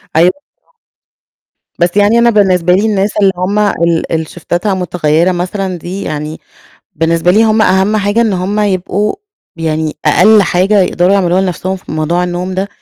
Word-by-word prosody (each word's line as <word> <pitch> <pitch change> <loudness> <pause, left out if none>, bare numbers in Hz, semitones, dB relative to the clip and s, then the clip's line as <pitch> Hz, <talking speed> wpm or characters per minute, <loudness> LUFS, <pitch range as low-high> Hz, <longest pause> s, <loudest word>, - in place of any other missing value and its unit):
أيوه 175 +3 +4 0.2
بالضبط. - - -40 1.1
بس 175 +3 0
يعني 210 +3 +3
أنا 235 0 +4
بالنسبة 185 -5 +2
لي 200 +4 +2
الناس 205 -1 -1
اللي 195 -1 +4
هُم 195 +4 -1
ال 170 -5 0
اللي 160 -1 -1
شيفتاتها 175 +4 -3
متغيّرة 175 -1 0
مثلًا 185 +1 -3
دي، 185 +4 -6
يعني 150 +1 -5 0.6
بالنسبة 165 +2 +1
لي 220 +4 +4
هُم 220 0 +2
أهم 190 +3 +2
حاجة 205 +3 0
إن 220 -3 +1
هُم 190 +3 -2
يبقوا 200 +1 -1 0.4
يعني 160 -1 -2
أقل 200 +7 +5
حاجة 190 +3 +2
يقدروا 180 +1 +1
يعملوها 185 -2 +2
لنفْسهم 190 0 -3
في 185 - -11
موضوع 165 +3 -1
النوم 180 +1 -4
ده، 195 +2 -2
185 Hz, 165 wpm, -12 LUFS, 175-205 Hz, 1.1 s, أقل